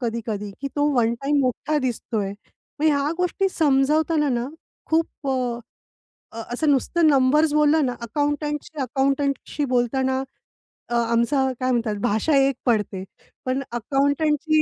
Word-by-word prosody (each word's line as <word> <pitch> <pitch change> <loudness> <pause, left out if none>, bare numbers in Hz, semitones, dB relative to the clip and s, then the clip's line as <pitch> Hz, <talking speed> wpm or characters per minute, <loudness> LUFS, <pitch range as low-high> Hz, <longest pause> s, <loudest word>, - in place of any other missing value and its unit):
कधी-कधी 225 -4 -3
की 275 - -3
तो 290 0 +2
वन 235 -2 +2
टाईम 285 +1 +2
मोठा 275 +4 0
दिसतोय. 225 -6 -2 0.5
मग 310 - +3
ह्या 290 -1 +2
गोष्टी 360 +2 +1
समजावताना 300 0 +2
ना 240 0 -1 0.4
खूप 320 0 +2 0.2
अ, 250 -3 -1 0.7
अ, 230 - -6
असं 305 +4 +1
नुसतं 315 +5 +2
नंबर्स 290 +2 +4
बोललं 300 0 +4
ना 250 - -1
अकाउंटंटशी 295 +5 -2
अकाउंटंटशी 275 +3 -1
बोलताना 260 +1 0 0.7
अ, 240 - -1
आमचा 235 +4 +2
काय 255 0 0
म्हणतात 230 -3 0
भाषा 240 +6 +1
एक 270 0 +3
पडते. 210 -5 0 0.4
पण 260 +1 0
अकाउंटंटची 285 +5 +1
270 Hz, 130 wpm, -23 LUFS, 240-295 Hz, 0.7 s, नंबर्स